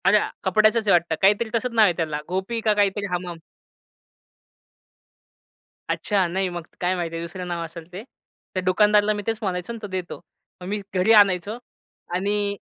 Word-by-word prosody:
अरे! 200 +2 +6 0.2
कपड्याचच 215 +3 +3
आहे - - +5
वाटतं, 170 -2 +3
काहीतरी 210 +4 +3
तसंच 250 +2 -1
नाव 225 -1 +5
आहे 180 - +3
त्याला, 155 -3 -2
गोपी 190 +6 -2
का 215 -1 +3
काहीतरी 205 0 +1
हम-हम. 175 -1 -3 2.5
अच्छा, 195 -4 +1
नाही 190 +2 -1
मग 175 -1 -7
काय 180 +1 +1
माहिती 165 -2 -3
दुसरं 180 +2 -6
नाव 170 -1 -3
असेल 165 +1 -11
ते. 195 +4 -7 0.5
त्या 185 - -2
दुकानदाराला 210 +3 +4
मी 205 - -4
तेच 225 -1 0
म्हणायचो 185 +1 -3
अन् 230 - -7
तो 205 - -5
देतो. 185 -2 -5 0.4
मग 180 - -7
मी 205 +1 -2
घरी 185 +4 +3
आणायचो 200 0 +4 0.6
आणि 200 +2 0
190 Hz, 165 wpm, -23 LUFS, 180-210 Hz, 2.5 s, अरे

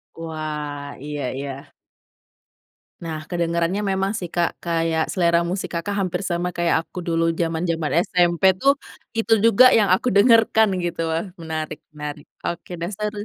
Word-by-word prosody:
Wah 150 -3 -5 0.2
iya 145 -1 -4 0.2
iya. 140 +1 -7 1.3
Nah 160 -2 -4
kedengerannya 170 +2 0
memang 195 +1 0
sih 180 - -4
Kak 170 -1 +2
kayak 165 -1 +1
selera 170 -2 +3
musik 185 +1 -3
Kakak 170 +4 -2
hampir 185 -1 -1
sama 175 +1 -1
kayak 175 -1 +2
aku 180 - -9
dulu 165 0 +1 0.2
zaman-zaman 165 -1 -1 0.2
SMP 175 -1 +2 0.2
tuh, 275 +1 +5 0.4
itu 225 0 +2
juga 230 +3 +7
yang 205 -4 +3
aku 195 - +1
dengarkan 220 0 +5 0.2
gitu 170 -1 -3
wah 165 +4 -1 0.2
menarik 155 -1 -4 0.2
menarik 150 -1 -7 0.2
oke 175 +1 -4
deh 170 - -2
seru. 210 -1 -3
170 Hz, 145 wpm, -22 LUFS, 160-190 Hz, 1.3 s, juga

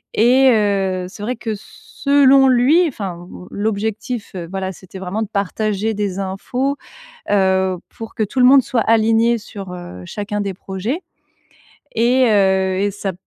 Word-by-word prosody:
et 255 +4 +5
heu, 195 -4 +1
c'est 205 - -12
vrai 250 +3 -2
que, 225 -2 -4
s 210 - -11
selon 275 -1 +6
lui 275 +8 +4
enfin, 180 - -6
l 180 - -10
l'objectif, 220 +2 -3
heu, 170 -2 -5
voilà, 190 0 -3
c'était 185 +2 -12
vraiment 190 +4 -3
de 215 - -2
partager 215 +1 -1
des 200 -2 -3
infos, 245 +9 -2 0.6
heu, 190 -2 +2
pour 225 -1 -9
que - - -3
tout 215 +6 -3
le 250 - +6
monde 270 +1 +7
soit 235 -3 0
aligné 225 +1 +3
sur, 195 -4 -9
heu, 175 - -9
chacun 205 - -4
des 200 -1 -3
projets 200 - -4 0.9
et 245 +3 +3
heu, 190 -2 +2
et 205 0 +1
ça 200 -1 -4
210 Hz, 165 wpm, -19 LUFS, 190-235 Hz, 0.9 s, monde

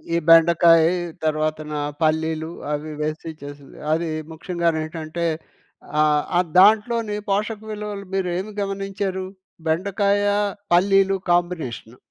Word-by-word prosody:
ఈ - - +3
బెండకాయి 165 0 +6 0.3
తరువాతన, 155 0 -1 0.3
పల్లీలు 160 +1 0 0.2
అవి 150 +1 -4
వేసి 155 +2 -3
చేసింది. 145 -1 -11 0.2
అది 165 +1 -1 0.2
ముఖ్యంగనేంటంటే, 165 -1 -2 0.8
ఆహ్, 150 -1 +3 0.2
ఆహ్, 180 - 0
దాంట్లోని 215 +1 +4
పోషక 210 +2 -1
విలువలు 210 -1 -5
మీరు 190 -2 0
ఏమి 205 +3 -5
గమనించారు? 195 -1 -3 0.4
బెండకాయ, 200 +4 +1 0.5
పల్లీలు 195 +2 +4
కాంబినేషను. 165 -10 -2
170 Hz, 100 wpm, -22 LUFS, 155-195 Hz, 0.8 s, బెండకాయి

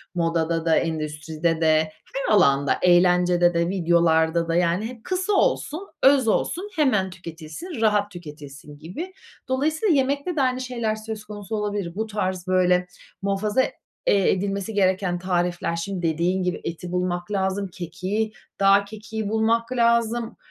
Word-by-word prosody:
modada 165 -1 0
da, 165 -1 +4
endüstride 160 +1 -1
de, 155 0 +3 0.2
her 270 -5 0
alanda; 140 -8 +4
eğlencede 180 0 +4
de, 170 0 +1
videolarda 170 -2 +2
da, 165 - 0
yani 175 +4 +1
hep 235 -2 -11
kısa 370 +2 -1
olsun, 380 -1 0 0.2
öz 270 -3 +5
olsun, 360 - 0
hemen 235 -11 +2
tüketilsin, 175 - -8
rahat 210 -2 +2
tüketilsin 150 -4 -11
gibi. 305 - -7 0.3
Dolayısıyla 310 - +1
yemekte 280 +5 0
de 290 - +1
aynı 255 -1 +1
şeyler 235 -4 -2
söz 215 0 -7
konusu 210 +1 -6
olabilir. 205 -4 -3
Bu 220 +2 -2
tarz 190 -4 -3
böyle 180 -1 +3 0.3
muhafaza, 205 +5 +1 0.5
eee, 195 -2 +4
edilmesi 200 +2 -2
gereken 190 -2 +1
tarifler 175 -2 -1
şimdi 180 +2 -4
dediğin 175 +4 0
gibi 180 -1 -2
eti 170 +1 -5
bulmak 180 +1 -2
lazım, 195 0 -1
kekiği, 190 +5 -3 0.3
dağ 200 0 +5
kekiği 215 0 -6
bulmak 225 +2 +1
lazım, 235 -1 +1
190 Hz, 140 wpm, -24 LUFS, 170-220 Hz, 0.5 s, öz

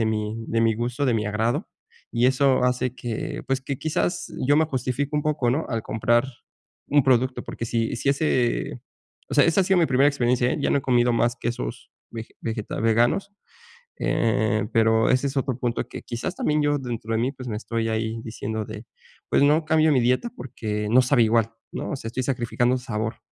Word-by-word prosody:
de 110 - +1
mi 110 +1 -2
de 115 - +1
mi 115 -1 +3
gusto, 120 +5 -2
de 120 - +2
mi 105 -1 0
agrado, 110 +3 -1 0.4
y 120 +1 +2
eso 130 0 +3
hace 125 0 0
que 120 -3 -4
pues, 135 0 0
que 135 -1 -5
quizás 160 +3 -2
yo 145 +2 +4
me 160 - +4
justifico 135 0 -2
un 150 - +1
poco, 145 -5 +1
¿no?, 145 +6 0
al 115 -2 -2
comprar 120 +3 +1 0.6
un 145 0 +4
producto 130 0 +2
porque - - -6
si 115 -1 -1
si 130 - -2
ese, 130 -4 0 0.5
o 140 - -4
sea, 145 - +6
esa 165 +3 +3
ha - - -1
sido 190 0 +3
mi 170 - +4
primera 135 +2 +3
experiencia, 125 -3 +1
eh, - - -1
ya - - +1
no - - +3
he - - -2
comido 120 -2 +3
más 120 +1 +1
quesos 115 - -5 0.2
vege 115 -1 -8
vegeta 110 -2 -4
veganos. 120 - +2 0.7
Eh, 110 -2 +1
pero 115 0 +3
ese 130 +2 +2
es 140 0 -4
otro 130 -2 -1
punto 120 -2 -2
que - - -8
quizás 120 +9 -5
también 150 0 +1
yo 145 0 +2
dentro 115 -3 -4
de 110 - +1
mí, 130 +3 0
pues, 130 -2 -9
me 110 - -3
estoy 115 +1 -2
ahí 110 0 -2
diciendo 110 -1 -4
de 110 +2 -9 0.4
pues: - - +3
"No 150 +3 +4
cambio 155 0 +3
mi 130 - +3
dieta 125 - +1
porque 105 -4 -4
no 125 +4 +6
sabe 125 -2 +4
igual", 115 0 +2 0.2
¿no?, - - -4
o - - -1
sea, 130 - -7
estoy 130 +2 -3
sacrificando 125 0 0
sabor, 110 -3 -4
120 Hz, 210 wpm, -24 LUFS, 115-135 Hz, 0.7 s, sea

